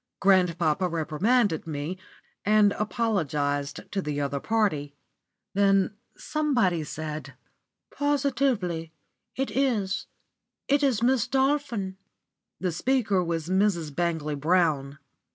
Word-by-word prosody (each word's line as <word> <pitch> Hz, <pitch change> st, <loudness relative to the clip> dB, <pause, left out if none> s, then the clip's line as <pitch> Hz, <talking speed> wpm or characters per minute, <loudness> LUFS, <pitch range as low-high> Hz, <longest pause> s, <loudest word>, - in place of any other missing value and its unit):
Grandpapa 180 Hz, -3 st, +3 dB
reprimanded 170 Hz, -, +1 dB
me, 150 Hz, +3 st, -3 dB, 0.5 s
and 210 Hz, -1 st, +5 dB
apologised 150 Hz, -, -1 dB
to 195 Hz, -, -1 dB
the 150 Hz, -3 st, -3 dB
other 140 Hz, 0 st, -1 dB
party. 155 Hz, -9 st, 0 dB, 0.6 s
Then 195 Hz, 0 st, +3 dB, 0.2 s
somebody 240 Hz, -, +1 dB
said: 155 Hz, 0 st, -6 dB, 0.6 s
"Positively 250 Hz, -, 0 dB, 0.4 s
it 270 Hz, +1 st, -2 dB
is 230 Hz, -8 st, 0 dB, 0.6 s
it 285 Hz, +1 st, +3 dB
is 255 Hz, -6 st, +2 dB
Miss 245 Hz, -1 st, +3 dB
Dolphin." 265 Hz, -8 st, 0 dB, 0.6 s
The 185 Hz, -1 st, -1 dB
speaker 205 Hz, 0 st, +1 dB
was 165 Hz, -2 st, -2 dB
Mrs. 185 Hz, -5 st, +1 dB
Bangley 160 Hz, -3 st, -1 dB
Brown. 145 Hz, -3 st, +1 dB
190 Hz, 100 wpm, -26 LUFS, 155-230 Hz, 0.6 s, and